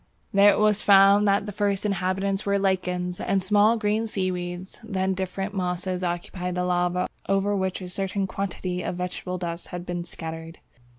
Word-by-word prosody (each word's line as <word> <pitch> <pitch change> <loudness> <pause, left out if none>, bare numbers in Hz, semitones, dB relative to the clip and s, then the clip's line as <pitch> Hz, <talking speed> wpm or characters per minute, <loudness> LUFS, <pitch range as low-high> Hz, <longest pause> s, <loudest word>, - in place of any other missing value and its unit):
There 200 +1 +7
it 205 - +3
was 210 -1 +3
found 200 +1 +6
that 200 0 +2
the 210 - -5
first 200 0 -1
inhabitants 195 0 0
were 200 0 +1
lichens 180 -2 -1
and 195 -1 0
small 210 +4 +4
green 215 +1 0
seaweeds; 180 -2 -3
then 190 -3 -1
"different 190 +2 -3
mosses 180 -1 -2
occupied 180 +1 -3
the 180 - 0
lava 180 0 +1 0.2
over 195 +1 +2
which 190 -1 -1
a - - -6
certain 195 +1 -2
quantity 185 -2 -3
of 180 - -3
vegetable 180 0 -4
dust 170 -1 -5
had 175 0 -6
been 175 -1 -3
scattered." 165 -1 -7
190 Hz, 170 wpm, -25 LUFS, 180-200 Hz, 0.2 s, There